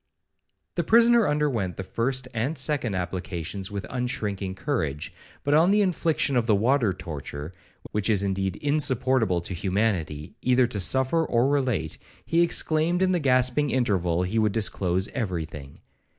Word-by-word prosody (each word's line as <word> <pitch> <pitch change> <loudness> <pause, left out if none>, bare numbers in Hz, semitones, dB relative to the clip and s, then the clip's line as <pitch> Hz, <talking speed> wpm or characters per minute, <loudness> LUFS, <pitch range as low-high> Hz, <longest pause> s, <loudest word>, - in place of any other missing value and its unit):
The 175 - -1
prisoner 235 +4 +5
underwent 135 - -1
the 95 - -4
first 125 +7 -2
and 125 +8 -2
second 130 -6 0
applications 90 +1 -4
with 100 -2 -5
unshrinking 105 -7 -3
courage, 85 - -3 0.3
but 145 - +1
on 160 +4 +5
the 205 +1 +4
infliction 165 -6 0
of 120 -2 +1
the 110 - +4
water 115 +1 +2
torture, 80 -3 -7 0.4
which 105 +1 -1
is 100 -3 +3
indeed 95 -1 -1
insupportable 130 - +1
to 90 - -6
humanity, 90 -4 -2
either 125 0 +3
to 115 -4 -4
suffer 130 - +2
or 120 -4 +1
relate, 125 - -1 0.3
he 165 +1 +2
exclaimed 170 +1 +1
in 185 - +2
the 180 - +1
gasping 130 +1 +2
interval, 95 -10 0
he 100 +5 -1
would 105 -2 +1
disclose 95 -3 0
every 90 - -3
thing. 70 -3 -11
115 Hz, 150 wpm, -25 LUFS, 95-140 Hz, 0.4 s, prisoner